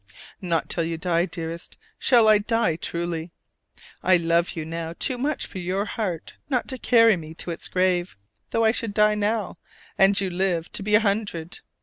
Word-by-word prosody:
Not 170 -4 -1
till 170 - -1
you 165 0 -3
die, 170 +1 +1
dearest, 165 -1 -6 0.2
shall 235 -4 +5
I 215 -1 +6
die 225 -5 +1
truly! 170 0 -4 0.7
I 185 -1 +5
love 170 0 +1
you 160 -2 -4
now 165 +1 -5
too 260 - -1
much 290 +3 -1
for 190 - -8
your 185 +3 -1
heart 185 -8 -4
not 255 -4 0
to 260 -2 -4
carry 230 -3 +5
me 160 -2 -9
to 175 - -5
its 165 - -4
grave, 180 - 0 0.3
though 230 0 +1
I 220 - +5
should 225 -3 -3
die 210 0 +4
now, 210 -1 -1 0.4
and 195 +1 +5
you 190 -2 -1
live 175 -2 -1
to - - -1
be 210 +1 +2
a 210 - +5
hundred. 200 -6 -2
185 Hz, 190 wpm, -24 LUFS, 170-215 Hz, 0.7 s, I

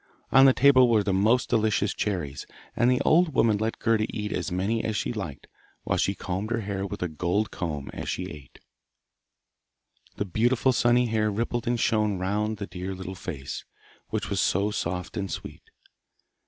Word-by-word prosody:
On 135 0 +7
the 135 - +8
table 130 -2 +6
were 110 -3 +3
the 100 - 0
most 110 +6 +3
delicious 105 -2 +1
cherries, 85 -9 -3 0.3
and 120 - +3
the 125 - +3
old 165 -1 +3
woman 110 -3 +3
let 110 +1 -1
Gerda 110 -1 +1
eat 105 -1 -4
as 90 - -3
many 100 +6 0
as 110 - -2
she 120 - -1
liked, 85 - -6 0.4
while - - 0
she 100 - +1
combed 95 +4 -4
her 115 -1 -1
hair 100 -1 -3
with 90 - -5
a - - 0
gold 85 +7 -1
comb 75 -6 -4
as - - -5
she 90 - -2
ate. 75 -4 -12 1.6
The 100 - -2
beautiful 120 +7 +2
sunny 120 +1 +3
hair 110 -2 +1
rippled 115 +3 -2
and 120 0 +1
shone 105 -3 +1
round 105 +4 -1
the 100 - -4
dear 95 +1 -6
little 95 0 -6
face, 80 -8 -6 0.5
which - - -2
was - - +1
so 100 +3 +1
soft 90 0 -3
and 100 -2 -2
sweet. - - -8
105 Hz, 180 wpm, -26 LUFS, 95-115 Hz, 1.6 s, the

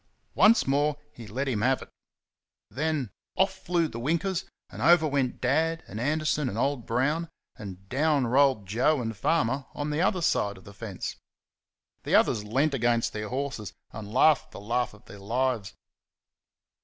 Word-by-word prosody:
Once 225 +3 +5
more 145 +2 +2 0.2
he 115 -2 -10
let 130 +6 -3
him 115 -6 -1
have 130 +3 +2
it. - - -16 0.8
Then 150 -6 -1 0.2
off 190 0 +2
flew 175 -3 0
the 115 -5 -7
winkers, 170 +7 -1 0.3
and - - -8
over 170 -2 +5
went 135 -3 -1
Dad 160 +6 +1
and 105 - -7
Anderson 150 0 0
and 100 - -5
old 135 -1 -1
Brown, 145 +8 0 0.3
and 95 -2 -9
down 145 +2 +2
rolled 130 -3 +3
Joe 125 +10 +2
and 115 -2 -3
Farmer 135 - 0
on 145 +1 -3
the 150 +2 0
other 180 -1 +1
side 100 -9 +1
of 95 - -15
the 100 - -12
fence. 100 -2 -6 0.8
The - - +1
others 105 - +3
leant 135 +8 +1
against 120 -2 +1
their 105 -1 -4
horses 130 -5 -4 0.2
and 105 -2 -8
laughed 150 +5 +4
the - - -10
laugh 120 +2 -1
of 105 - -20
their 100 - -12
lives. 115 0 -1
130 Hz, 170 wpm, -27 LUFS, 110-155 Hz, 0.8 s, Once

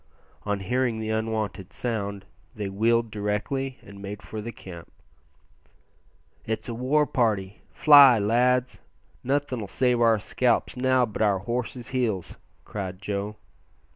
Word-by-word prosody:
On 100 -1 -1
hearing 125 +2 0
the 110 0 -3
unwonted 110 -3 -2
sound 100 -5 -3 0.3
they 105 -3 -4
wheeled 115 +3 +1
directly 110 +6 -2
and 100 -1 -12
made 100 0 -7
for 110 - -6
the 115 +2 -6
camp. 85 -6 -11 1.5
"It's 110 0 -4
a 120 - -4
war 135 +6 +2
party; 105 -8 -1
fly, 140 -5 +8
lads! 125 +4 +1 0.4
nothin' 135 -2 -1
'll - - -6
save 125 +3 +1
our 115 -1 +5
scalps 120 +3 0
now 130 0 +3
but 110 -2 -6
our 105 -3 +3
horses' 120 +4 -4
heels," 115 -9 -2 0.3
cried 95 -3 -5
Joe. 100 +1 -3
110 Hz, 135 wpm, -26 LUFS, 100-125 Hz, 1.5 s, fly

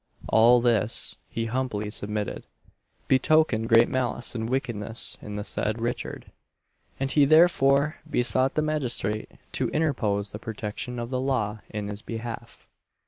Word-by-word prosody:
All 120 +2 +6
this, 115 -3 +2
he 115 - -3
humbly 115 -3 -2
submitted, 105 -1 -4 0.6
betokened 130 -4 +3
great 115 0 +6
malice 125 -2 -1
and 115 -1 -3
wickedness 120 -4 0
in 105 - -7
the 105 - -3
said 110 +1 -1
Richard, 120 +1 -4 0.7
and 135 0 -1
he 145 - +4
therefore 150 -2 +4
besought 130 +1 +1
the 155 - +1
magistrate 125 -8 -1 0.2
to - - -1
interpose 110 -10 0
the 105 - -7
protection 110 +2 -5
of 120 +1 -5
the 130 -1 -1
law 115 -6 -1
in 105 -1 -4
his 105 0 -6
behalf. 115 +1 -7
120 Hz, 140 wpm, -26 LUFS, 105-130 Hz, 0.7 s, All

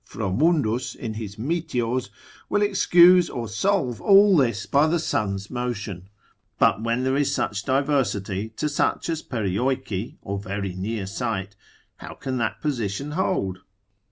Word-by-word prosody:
Fromundus 115 - 0
in 110 - -5
his 105 -2 -7
Meteors 125 -4 -2 0.4
will 205 - +2
excuse 180 -3 +5
or 120 -2 -4
solve 125 - 0
all 200 -1 +6
this 120 - +1
by 145 +2 +3
the 170 +2 +2
sun's 100 - -2
motion, 105 -7 -4 0.5
but 105 - +3
when 115 +2 0
there 130 +1 +1
is 145 0 +1
such 100 -1 -2
diversity 125 -8 0
to 150 - 0
such 150 +3 0
as 160 -1 -1
Perioeci 115 0 -2
or 100 0 -3
very 100 -1 -4
near 100 +2 -3
site, 100 -2 -3 0.4
how - - -9
can 130 -2 -4
that 115 -2 -2
position 135 -1 -2
hold? 150 - -1
120 Hz, 140 wpm, -24 LUFS, 100-145 Hz, 0.5 s, all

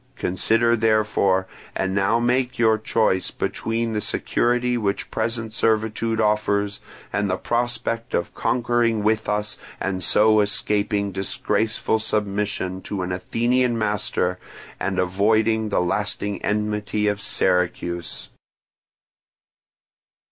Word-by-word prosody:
Consider, 115 +6 +2
therefore; 110 -4 +2 0.3
and 95 0 -1
now 100 +4 +2
make 125 +1 +1
your 110 -2 +3
choice 110 -4 +1
between 115 0 -2
the 105 - -1
security 120 +3 0
which 105 -4 -2
present 115 0 -2
servitude 110 0 0
offers 105 -2 +1 0.3
and 100 0 0
the 90 - 0
prospect 120 0 -2
of 85 - -2
conquering 120 -3 +1
with 110 +1 +1
us 105 0 -2 0.2
and 95 -2 -2
so 110 +5 +5
escaping 100 0 0
disgraceful 110 +3 -1
submission 100 -3 -1
to 95 -2 -4
an 90 - -3
Athenian 120 +6 +1
master 105 -4 -1 0.4
and - - -2
avoiding 110 +4 +2
the 100 - +1
lasting 100 +2 -2
enmity 105 0 -1
of 105 -1 0
Syracuse." 90 -2 -1
105 Hz, 110 wpm, -23 LUFS, 100-115 Hz, 0.4 s, so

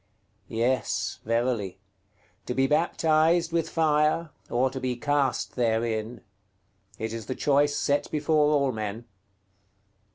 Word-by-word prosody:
Yes, 120 +3 -1
verily: 115 -4 -1 0.7
to 125 - -2
be 135 - +3
baptized 160 +2 +2
with 165 -1 0
fire, 155 0 +1 0.2
or 130 +2 +1
to 130 - -5
be 130 -1 -2
cast 140 0 0
therein; 115 -1 -1 0.8
it 110 0 -4
is 115 -3 -6
the 130 - -3
choice 145 0 +2
set 145 +1 0
before 150 0 +2
all 140 -3 +2
men. 110 0 -5
135 Hz, 120 wpm, -26 LUFS, 115-150 Hz, 0.8 s, be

